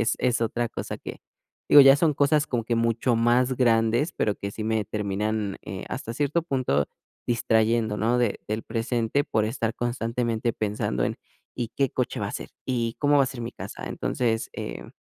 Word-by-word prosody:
es 115 - +2
es 125 -1 +1
otra 115 +1 0
cosa - - -5
que, - - -8 0.5
digo, 145 - +10
ya 135 +1 +8
son 155 -1 +2
cosas 145 +2 +3
como 120 -3 -2
que 115 - 0
mucho 115 +1 +1
más 120 +3 +3
grandes, 120 +5 +2
pero 105 -2 0
que 100 - -5
sí 110 +1 -6
me 110 -1 0
terminan, 105 0 -2
eh, - - -6
hasta 115 - -5
cierto 150 +4 0
punto, 130 - 0 0.4
distrayendo, 115 -2 +2
¿no?, 115 +3 +1
de 120 -4 0
del 110 +1 -2
presente 115 +4 -1
por 110 -1 0
estar 115 0 -2
constantemente 120 -1 -1
pensando 100 - -2
en, - - -2 0.4
¿y 120 -3 -2
qué 135 -3 +2
coche - - -2
va - - -1
a - - -7
ser?, - - -5 0.2
¿y 120 -3 -1
cómo 145 0 +3
va 135 - +5
a - - -3
ser 130 -2 -6
mi 115 +1 -5
casa?, - - -8
entonces, 115 -2 -1
eh, - - -6
115 Hz, 190 wpm, -26 LUFS, 110-125 Hz, 0.5 s, digo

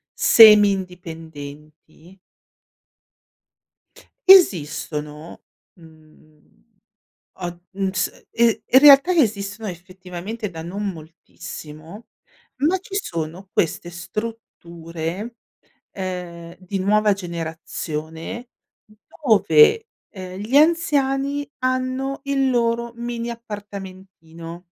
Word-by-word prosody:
semi 210 -2 +8
indipendenti? 165 -2 -9 2.1
Esistono, 155 - +3 0.3
mhmm, 155 -2 -22 0.8
o - - -3 0.3
mhmm 195 -1 -2
s 190 - -3
i 235 -1 +2
in 260 - +6
realtà 285 +4 +8
esistono, 215 - 0
effettivamente, 185 +4 -7
da 165 -3 -8
non 195 +5 -4
moltissimo, 160 +3 -11 0.6
ma 370 +4 +2
ci 390 +1 -10
sono 170 - -4
queste 170 +1 -1
strutture, 175 0 -6 0.6
ehm, 180 -3 -6
di 185 +2 -5
nuova 210 +2 +3
generazione, 165 +3 -6 0.4
dove, 215 - +3 0.2
ehm, 185 -2 -9
gli 220 +6 -3
anziani 285 -3 +2
hanno 255 +1 -2
il 275 -1 +1
loro 235 -1 0
mini 235 0 -4
appartamentino. 190 -6 -10
195 Hz, 80 wpm, -21 LUFS, 165-235 Hz, 2.1 s, semi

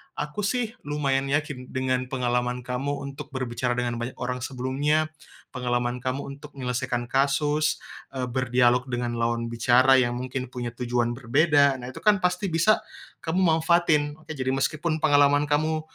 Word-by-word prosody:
aku 150 +7 -4
sih 230 +1 -1
lumayan 140 -2 0
yakin 145 -4 -2
dengan 130 -1 0
pengalaman 125 -1 0
kamu 125 +3 -2
untuk 140 +1 -7
berbicara 125 -1 -1
dengan 120 -1 -1
banyak 120 +2 -4
orang 125 0 -2
sebelumnya, 145 +5 0 0.5
pengalaman 120 -1 -1
kamu 130 +2 -1 0.2
untuk 150 0 -12
nyelesaikan 125 -1 -2
kasus, 145 +3 +2 0.3
eee, 130 -2 -2
berdialog 125 0 +2
dengan 120 -1 -2
lawan 115 0 0
bicara 125 +3 +5
yang 120 -1 +1
mungkin 130 +1 -4
punya 120 -1 -3
tujuan 120 -1 0
berbeda, 140 +1 +3
nah, 125 - -6
itu - - -9
kan 210 -2 +5
pasti 180 +2 +1
bisa 170 +7 +3 0.4
kamu 165 +3 0
manfaatin, 160 -3 +3
oke. 155 - -24
Jadi, 130 -3 -2
meskipun 155 +4 -1
pengalaman 145 -1 +5
kamu 155 +2 +1
130 Hz, 150 wpm, -25 LUFS, 125-150 Hz, 0.5 s, bicara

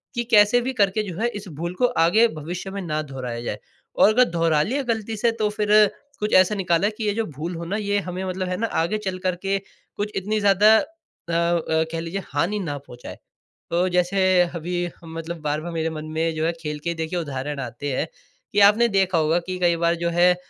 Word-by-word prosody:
कि 240 - 0
कैसे 215 +2 +6
भी 260 +2 -3
करके 205 -2 +2
जो 170 - -7
है 235 - +2
इस 205 -1 -7
भूल 170 +1 -2
को 250 - +4 0.2
आगे 220 +7 +5
भविष्य 175 +1 -6
में 200 0 -4
ना 155 -4 -2
दोहराया 125 -3 -5
जाए। 120 - -4 0.4
और - - +6
अगर 250 +3 +6
दोहरा 165 -3 +2
लिया 265 - -1
ग़लती 225 -2 -2
से 235 +2 +2
तो 210 - +2
फ़िर 210 0 0 0.5
कुछ 210 0 -2
ऐसा 185 +3 +5
निकाला 185 0 +1
कि 225 - -4
ये 205 - +1
जो 225 +1 -1
भूल 160 +3 -6
हो 170 +1 -6
ना 190 +5 -3
ये 205 -1 0
हमें 185 0 -5
मतलब 185 0 -3
है 180 - -2
ना 230 - 0
आगे 175 +6 0
चल 190 -3 -4
कर 185 -1 +1
के 195 0 +1 0.4
कुछ 210 +1 -2
इतनी 210 +3 -1
ज़्यादा 205 +2 +5
अ - - +3 0.5
अ, 170 -1 +1
कह 165 - -3
लीजिये 170 +3 -4
हानि 205 +5 0
ना 150 -7 -3
पहुँचाए। 125 -3 -11 0.6
अ, 180 +2 +2
जैसे 180 +2 +1 0.4
अभी 175 +1 -2
मतलब 165 +1 -6
बार-बार 150 +3 -2
मेरे 165 0 -1
मन 155 -1 -6
में 160 0 0
जो 155 - -1
है 165 - +2
खेल 150 -1 -4
के 170 - 0
देखिए 160 +2 -3
उदाहरण 145 -2 -4
आते 125 +3 -5
हैं 150 - -1 0.5
कि 205 - +3
आपने 230 +3 +4
देखा 190 -2 +2
होगा 160 +2 +2
कि 185 - -3
कई 175 -1 +3
बार 170 0 +3
जो 170 0 -1
है 180 0 +6
180 Hz, 225 wpm, -23 LUFS, 165-205 Hz, 0.6 s, कैसे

